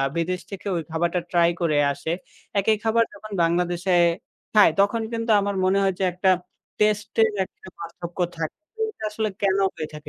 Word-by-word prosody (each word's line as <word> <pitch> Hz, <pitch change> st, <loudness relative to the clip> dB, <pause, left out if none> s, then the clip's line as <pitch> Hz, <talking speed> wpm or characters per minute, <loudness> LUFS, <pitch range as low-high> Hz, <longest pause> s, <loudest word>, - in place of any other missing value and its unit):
আ -, -, +2 dB
বিদেশ 180 Hz, +2 st, -1 dB
থেকে 195 Hz, 0 st, -8 dB
ওই 165 Hz, -, -1 dB
খাবারটা 170 Hz, +2 st, 0 dB
ট্রাই 170 Hz, -1 st, +4 dB
করে 155 Hz, -3 st, +2 dB
আসে, 160 Hz, -, -4 dB, 0.5 s
একই 215 Hz, +2 st, +2 dB
খাবার 230 Hz, +1 st, +3 dB
যখন 210 Hz, +1 st, -11 dB
বাংলাদেশে 175 Hz, +2 st, +1 dB, 0.6 s
খায়, 210 Hz, -6 st, +7 dB
তখন 225 Hz, +3 st, +2 dB
কিন্তু 230 Hz, 0 st, -2 dB
আমার 200 Hz, 0 st, -1 dB
মনে 190 Hz, +1 st, +3 dB
হয় 190 Hz, -1 st, +2 dB
যে 190 Hz, -, 0 dB
একটা 185 Hz, +2 st, +2 dB, 0.5 s
টেস্টে 210 Hz, +1 st, +1 dB
এর 205 Hz, -, -8 dB
একটা -, -, -16 dB
পার্থক্য 170 Hz, +1 st, -8 dB, 0.2 s
থাকে। 160 Hz, -1 st, -4 dB, 0.3 s
এটা 305 Hz, -, -11 dB
আসলে 215 Hz, 0 st, -1 dB
কেনো 195 Hz, -1 st, +2 dB
হয়ে 155 Hz, -, -4 dB
থাকে, 150 Hz, 0 st, -9 dB
190 Hz, 180 wpm, -24 LUFS, 170-210 Hz, 0.6 s, খায়